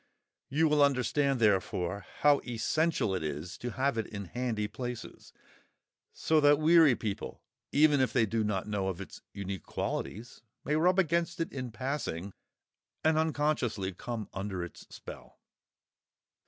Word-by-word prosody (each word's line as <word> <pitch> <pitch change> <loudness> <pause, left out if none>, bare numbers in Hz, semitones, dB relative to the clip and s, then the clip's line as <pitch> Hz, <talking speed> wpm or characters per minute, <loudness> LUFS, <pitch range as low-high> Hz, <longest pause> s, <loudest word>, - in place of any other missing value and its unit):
You 160 +4 +3
will 150 -1 +3
understand, 135 0 +2
therefore, 95 -2 +1
how 145 -1 +6
essential 120 - 0
it 95 - -1
is 80 +3 -4
to 120 -2 -4
have 130 -2 0
it 110 - -2
in 100 -2 -6
handy 115 0 -2
places, 125 0 -7 0.8
so 160 -1 +2
that 145 0 +6
weary 155 -3 +6
people, 105 -4 -5 0.3
even 150 -1 +5
if 130 - +2
they 120 -4 +3
do 110 +1 0
not 105 -2 -1
know 100 -2 -1
of 95 -2 -3
its 100 - -9
unique 100 -3 -5
qualities, 115 +5 -4 0.2
may 150 - +1
rub 180 +4 +3
against 170 -1 +1
it 165 - -2
in 130 -2 -4
passing, 120 - -3 0.7
and 160 0 +4
unconsciously 145 -11 0
come 115 +3 -5
under 95 -2 -3
its 85 - -10
spell. - - -11
120 Hz, 145 wpm, -30 LUFS, 100-150 Hz, 0.8 s, how